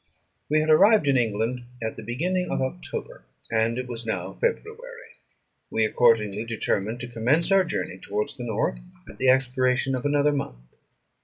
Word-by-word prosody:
We 155 +1 +3
had 155 0 +2
arrived 200 +1 +6
in 140 - +4
England 115 +1 0 0.2
at 110 -2 -4
the - - -8
beginning 180 - -2
of - - -1
October, 135 +7 -5 0.3
and 115 +1 +1
it 125 - -3
was 120 -2 -5
now 110 - -3
February. 475 +1 -4 0.5
We 110 - +1
accordingly 110 -2 +2
determined 110 -1 -2
to 125 - -4
commence 125 - +1
our 195 -1 +6
journey 95 - -4
towards 105 +3 -3
the 125 - -7
north 110 - -1 0.3
at - - -13
the 130 - +3
expiration 130 0 +2
of 125 -1 -2
another 145 0 +2
month. 65 - -6
125 Hz, 165 wpm, -25 LUFS, 115-155 Hz, 0.5 s, arrived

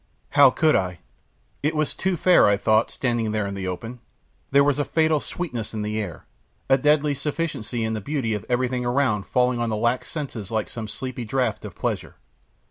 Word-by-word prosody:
How 145 -2 +7
could 155 +4 +3
I? 90 -2 0 0.6
It 150 +2 0
was 155 -1 0
too 190 -2 -1
fair, 180 - +5
I 100 0 +4
thought, 110 +2 +3
standing 120 -4 -1
there 105 -1 0
in 100 - -4
the 95 -1 -4
open; 115 +7 -5 0.5
there 140 +1 +5
was 145 0 +2
a - - +2
fatal 160 0 +2
sweetness 125 -11 -5
in 105 - -2
the 105 +1 -2
air, 95 -6 -6 0.4
a 135 0 +4
deadly 150 +1 +3
sufficiency 140 -5 -3
in 110 0 -1
the 110 - -3
beauty 130 -2 -1
of 105 - -3
everything 125 0 0
around 120 -5 +1
falling 125 -1 +2
on 120 -1 0
the 110 - -1
lax 120 +3 0
senses 130 - -5
like 110 -2 -1
some 115 -2 -6
sleepy 130 +2 -5
draught 125 +3 -1
of - - -8
pleasure. - - -3
125 Hz, 200 wpm, -24 LUFS, 110-145 Hz, 0.6 s, How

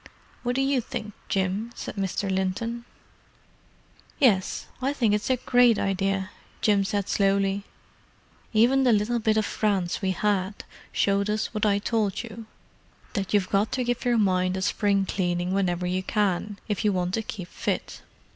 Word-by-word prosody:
"What 245 0 -1
do 270 - +2
you 270 -2 +2
think, 215 -2 -6 0.2
Jim?" 195 +4 0
asked - - -6
Mr. 195 0 -2
Linton. 195 +5 -2 1.3
"Yes, 200 -9 +2 0.2
I 270 +2 +1
think 230 -7 +2
it's 210 +3 0
a 260 - +4
great 245 -2 +4
idea," 195 0 0 0.3
Jim 205 -2 +3
said 200 0 -1
slowly. 195 0 +1 0.9
"Even 245 +5 +4
the 245 -3 +5
little 215 +3 +1
bit 220 -1 +2
of 215 - +2
France 195 -6 0
we 190 - 0
had 195 +1 0 0.3
showed 200 +1 +1
us 215 +2 -1
what 215 0 +1
I 200 -1 +3
told 210 0 -1
you—that 220 -3 -9
you've 205 -3 +2
got 200 +2 +2
to 255 - 0
give 245 0 -1
your 245 -2 +2
mind 185 -3 +2
a 190 - -2
spring 200 0 +2
cleaning 175 -1 -1
whenever 180 -2 0
you 185 +1 0
can, 205 0 0
if 210 -4 -1
you 210 - +3
want 180 -1 -1
to 225 - +1
keep 205 -4 -7
fit. - - -3
205 Hz, 165 wpm, -26 LUFS, 190-225 Hz, 1.3 s, the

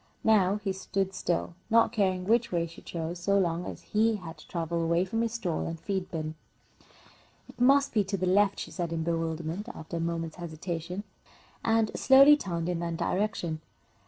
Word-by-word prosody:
Now 200 -3 +4
he 195 - 0
stood 190 0 -2
still, 175 -1 -1 0.2
not 230 0 +5
caring 190 -5 +1
which 235 +3 +2
way 170 -2 +1
she 165 - -12
chose 170 +1 -5
so 200 +3 +2
long 175 -2 0
as - - -7
he 220 +1 +2
had 165 -5 -8
to - - -15
travel 170 -1 -2
away 170 +2 +2
from 225 +4 -1
his 230 -1 -1
stall 185 -9 -2
and 165 0 -5
feed 190 0 -3
bin. 155 -2 -4 1.1
"It - - -12
must 275 +2 +5
be 215 -3 +3
to 195 +1 -2
the 185 - -1
left," 200 +2 +3
she - - -6
said, 175 -3 -3
in 165 -1 -1
bewilderment, 165 +4 -2
after 160 +1 -6
a - - -2
moment's 165 -1 -3
hesitation, 170 +2 -5 0.6
and 225 -1 +2
slowly 275 +2 +7
turned 170 - -3
in 175 -1 -1
that 170 -1 -3
direction. 180 -6 -1
180 Hz, 190 wpm, -29 LUFS, 165-210 Hz, 1.1 s, slowly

